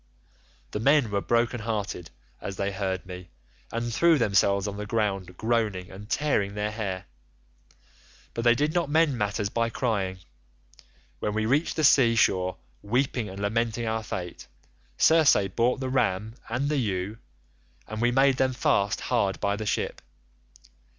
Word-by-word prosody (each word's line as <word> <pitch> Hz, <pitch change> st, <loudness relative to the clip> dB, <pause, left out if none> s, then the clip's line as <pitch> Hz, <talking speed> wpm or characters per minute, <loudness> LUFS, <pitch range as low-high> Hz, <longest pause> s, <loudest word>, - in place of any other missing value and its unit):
"The -, -, -3 dB
men 135 Hz, -1 st, +3 dB
were 100 Hz, -1 st, 0 dB
broken 120 Hz, +2 st, +1 dB
hearted 105 Hz, -6 st, -3 dB, 0.3 s
as 100 Hz, -, -5 dB
they 100 Hz, +1 st, -2 dB
heard 95 Hz, -2 st, -3 dB
me, 90 Hz, -1 st, -9 dB, 0.4 s
and 115 Hz, 0 st, -3 dB
threw 165 Hz, +6 st, +4 dB
themselves 100 Hz, -3 st, +2 dB
on 100 Hz, 0 st, -5 dB
the 105 Hz, 0 st, -5 dB
ground 95 Hz, -5 st, -1 dB
groaning 110 Hz, -5 st, -1 dB
and 100 Hz, +3 st, -11 dB
tearing 105 Hz, -9 st, 0 dB
their 105 Hz, 0 st, -1 dB
hair, 100 Hz, -4 st, -4 dB, 1.3 s
but 115 Hz, -, -3 dB
they 120 Hz, 0 st, +5 dB
did 150 Hz, +4 st, 0 dB
not 170 Hz, -5 st, 0 dB
mend 155 Hz, -2 st, +3 dB
matters 105 Hz, -2 st, -1 dB
by 115 Hz, +2 st, 0 dB
crying. 100 Hz, -6 st, -1 dB, 1.0 s
When 105 Hz, -, -2 dB
we 110 Hz, 0 st, 0 dB
reached 140 Hz, +8 st, +1 dB
the 155 Hz, -, -1 dB
sea 130 Hz, -5 st, +5 dB
shore, 90 Hz, -4 st, +2 dB, 0.2 s
weeping 125 Hz, 0 st, 0 dB
and 95 Hz, +1 st, -8 dB
lamenting 115 Hz, +3 st, -1 dB
our 110 Hz, 0 st, -1 dB
fate, 90 Hz, -5 st, -6 dB, 0.5 s
Circe 160 Hz, -2 st, +5 dB, 0.2 s
brought 120 Hz, +2 st, +2 dB
the 130 Hz, -, -3 dB
ram 110 Hz, -4 st, 0 dB, 0.2 s
and 125 Hz, +5 st, -1 dB
the 150 Hz, 0 st, 0 dB
ewe, 105 Hz, -2 st, -2 dB, 0.7 s
and 110 Hz, +1 st, -5 dB
we 120 Hz, -, +4 dB
made 135 Hz, +1 st, +4 dB
them 130 Hz, 0 st, +2 dB
fast 100 Hz, -4 st, +1 dB
hard 100 Hz, -9 st, 0 dB
by 100 Hz, 0 st, 0 dB
the 110 Hz, 0 st, -5 dB
ship. -, -, -2 dB
110 Hz, 155 wpm, -26 LUFS, 100-125 Hz, 1.3 s, they